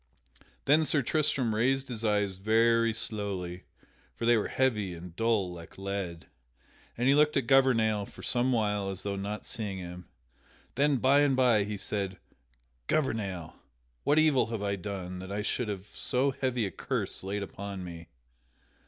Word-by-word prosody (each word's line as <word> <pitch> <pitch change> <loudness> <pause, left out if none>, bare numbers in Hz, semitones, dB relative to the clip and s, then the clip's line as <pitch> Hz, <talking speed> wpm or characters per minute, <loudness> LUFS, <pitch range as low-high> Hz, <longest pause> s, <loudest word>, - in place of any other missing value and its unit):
Then 150 +3 +5
Sir 150 -2 +2
Tristram 140 -5 +1
raised 130 +5 +1
his 115 -3 -6
eyes 105 -3 +1
very 115 +3 +3
slowly 100 -5 -4 0.5
(for 115 - -3
they 120 0 +6
were 110 - +1
heavy 105 -9 0
and 85 0 -10
dull 110 -5 +1
like 85 -1 -11
lead) 95 -4 -4 0.7
and 120 +2 +1
he 135 - +6
looked 150 +1 +4
at 135 - +1
Gouvernail 115 -6 +3
for - - -13
some 125 +1 +2
while 105 -4 0
as 95 -1 -5
though 100 -1 -2
not 100 +2 -4
seeing 105 -4 -4
him. 90 -1 -8 0.7
Then 140 0 +3
by 135 +3 +4
and 145 -2 +4
by 120 -6 +4
he 105 0 -4
said: 95 -1 -3 0.7
"Gouvernail, 100 - -1 0.5
what 145 - +3
evil 155 -6 +4
have 115 -2 -4
I 100 -1 0
done 95 -2 -5
that 95 +1 -7
I 105 +1 -2
should 120 +2 -1
have 100 -2 -4
so 130 +2 +1
heavy 130 -3 -1
a 95 - -3
curse - - -3
laid 100 +1 -2
upon 100 -1 -6
me?" 85 -2 -8
105 Hz, 165 wpm, -29 LUFS, 95-125 Hz, 0.7 s, they